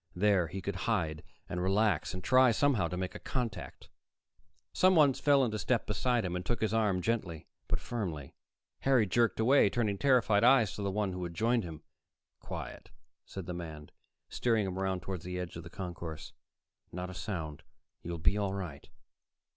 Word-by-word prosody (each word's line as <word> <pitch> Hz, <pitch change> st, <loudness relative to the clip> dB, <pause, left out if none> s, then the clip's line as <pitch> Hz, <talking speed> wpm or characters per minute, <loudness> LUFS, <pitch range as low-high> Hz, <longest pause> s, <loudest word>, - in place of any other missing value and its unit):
There 95 Hz, -2 st, +3 dB
he 95 Hz, +4 st, -6 dB
could 100 Hz, -1 st, -3 dB
hide 80 Hz, -8 st, 0 dB, 0.2 s
and 90 Hz, -, -3 dB
relax 95 Hz, -3 st, +2 dB
and 90 Hz, -, -6 dB
try, 130 Hz, +2 st, +5 dB
somehow, 115 Hz, -6 st, +2 dB
to 90 Hz, -, -4 dB
make 95 Hz, 0 st, -3 dB
a -, -, -8 dB
contact. 120 Hz, -6 st, -5 dB, 0.8 s
Someone 165 Hz, -7 st, +5 dB
fell 140 Hz, 0 st, +3 dB
into 110 Hz, -2 st, -2 dB
step 120 Hz, 0 st, 0 dB
beside 120 Hz, +1 st, 0 dB
him 90 Hz, -1 st, -2 dB
and 90 Hz, -, -3 dB
took 120 Hz, +5 st, -2 dB
his 110 Hz, -1 st, 0 dB
arm 105 Hz, -5 st, +1 dB
gently 90 Hz, -7 st, -2 dB, 0.2 s
but -, -, 0 dB
firmly. 85 Hz, -, -5 dB, 0.5 s
Harry 130 Hz, -5 st, +3 dB
jerked 115 Hz, +5 st, +1 dB
away, 120 Hz, -1 st, +5 dB
turning 105 Hz, -3 st, -1 dB
terrified 120 Hz, -6 st, +3 dB
eyes 120 Hz, -4 st, +5 dB
to -, -, -6 dB
the 100 Hz, -, -1 dB
one 100 Hz, 0 st, -1 dB
who 90 Hz, 0 st, -4 dB
had 85 Hz, -1 st, -5 dB
joined 115 Hz, +3 st, +2 dB
him. 80 Hz, -3 st, -8 dB, 0.6 s
"Quiet," -, -, -7 dB, 0.4 s
said 95 Hz, -3 st, -7 dB
the 90 Hz, -, -4 dB
man, 80 Hz, -3 st, -8 dB, 0.4 s
steering 115 Hz, -4 st, +1 dB
him 95 Hz, -1 st, -3 dB
over 95 Hz, 0 st, -1 dB
toward 90 Hz, -1 st, -5 dB
the 90 Hz, 0 st, -5 dB
edge 90 Hz, -1 st, -5 dB
of 85 Hz, -, -6 dB
the 85 Hz, -, -10 dB
concourse. 85 Hz, -4 st, -7 dB, 0.6 s
"Not 90 Hz, +1 st, -5 dB
a -, -, -9 dB
sound. 85 Hz, -5 st, -5 dB, 0.4 s
You'll 85 Hz, 0 st, -5 dB
be 90 Hz, +6 st, +2 dB
all 100 Hz, -1 st, -1 dB
right." 85 Hz, -8 st, -7 dB
95 Hz, 180 wpm, -31 LUFS, 90-115 Hz, 0.8 s, try